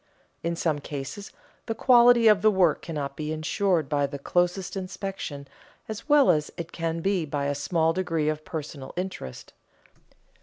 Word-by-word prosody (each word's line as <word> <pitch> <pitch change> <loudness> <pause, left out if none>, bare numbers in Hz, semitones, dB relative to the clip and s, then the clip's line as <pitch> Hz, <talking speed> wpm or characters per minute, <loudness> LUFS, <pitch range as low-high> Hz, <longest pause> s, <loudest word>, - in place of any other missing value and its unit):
In 170 0 -2
some 160 -3 0
cases 145 +8 -7 0.4
the 225 - -2
quality 240 -1 +6
of 210 -2 +6
the 215 - +5
work 185 -6 +3
cannot 145 -4 -4
be 155 0 -4
insured 160 +1 0
by 145 -1 +1
the 140 +1 -6
closest 180 +6 0
inspection 185 -6 -5 0.4
as 220 +7 -7
well 290 -7 +6
as 150 -3 0
it 165 -1 -6
can 165 0 -3
be 195 -1 +1
by 145 -2 -2
a 145 - 0
small 160 +3 +1
degree 165 -4 -1
of 155 0 -1
personal 150 -4 -7
interest. 180 - -6
165 Hz, 160 wpm, -26 LUFS, 150-195 Hz, 0.4 s, quality